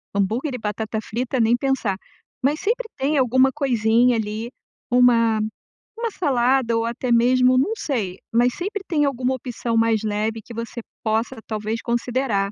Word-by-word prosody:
hambúrguer 230 +8 0
e - - -3
batata 220 0 -3
frita, 245 +4 -3
nem 230 +2 +3
pensar, 245 -7 0 0.5
mas 290 +3 +2
sempre 475 +2 -1
tem 290 +3 +1
alguma 260 +1 +4
coisinha 240 -2 +3
ali, 220 +2 -3 0.4
uma 230 -3 +4 0.6
uma 465 -1 -2
salada 255 - +2
ou 230 - 0
até 240 +2 -2
mesmo 250 +2 +4
não 325 +12 +2
sei, 210 - -2 0.2
mas 240 +1 +3
sempre 405 +2 -4
tem 300 -4 +2
alguma 260 -2 0
opção 240 -2 -4
mais 225 -1 +3
leve 215 +1 -1
que 235 - -11
você 230 +1 -5 0.2
possa 225 +3 0
talvez 215 +1 -3
considerar, 235 -4 0
240 Hz, 155 wpm, -22 LUFS, 225-265 Hz, 0.6 s, alguma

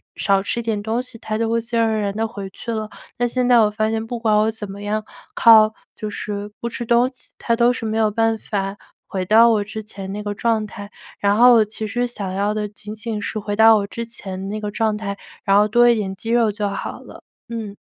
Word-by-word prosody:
少 195 -1 +2
吃 235 - -2
一 - - -4
点 220 -2 -1
东 225 +3 -1
西， 250 -2 -11
它 215 -1 -4
就 230 0 0
会 230 0 +1
自 235 +1 -6
然 230 - +4
而 220 -1 0
然 200 0 -2
地 225 0 0
回 200 -3 -7
去 235 - -6
了。 215 -1 -3 0.3
但 245 0 +1
现 250 +1 0
在 245 - +7
我 215 - +5
发 215 +1 0
现 220 0 -2
不 235 +1 -5
管 220 -2 +2
我 215 +1 +3
怎 210 -3 -7
么 200 +1 -9
样 215 +1 -1 0.3
靠， 220 -1 +7 0.2
就 215 - -5
是 205 0 -5
不 235 - -2
吃 240 +1 -5
东 235 +2 +4
西， 255 - -22
它 235 - +1
都 240 +1 +4
是 245 - -6
没 220 0 -1
有 220 -1 +2
办 225 +1 +1
法 195 -1 -3 0.3
回 190 -2 -3
到 225 +4 +6
我 215 -2 +2
之 215 +1 -6
前 195 -2 -8
那 210 +1 -4
个 205 0 -4
状 220 -1 0
态。 205 0 -10 0.3
然 200 0 +2
后 245 +2 +7
我 220 -2 +5
其 215 +1 -5
实 245 +3 -1
想 205 -6 -5
要 200 +2 0
的 210 -1 -2
仅 210 +1 -9
仅 220 0 -4
是 215 +1 -3
回 205 0 -3
到 225 +1 +7
我 200 -1 -2
之 235 +2 -5
前 195 -4 -7
那 215 +1 -4
个 210 - -3
状 215 0 0
态， 200 -2 -4 0.3
然 195 -1 +4
后 210 +1 +5
多 240 +3 +5
一 235 - +5
点 195 -3 -3
肌 225 - -7
肉 230 -2 +3
就 205 0 -2
好 195 - -5
了。 - - -13 0.3
嗯。 220 -3 -5
215 Hz, 280 characters per minute, -21 LUFS, 205-230 Hz, 0.3 s, 在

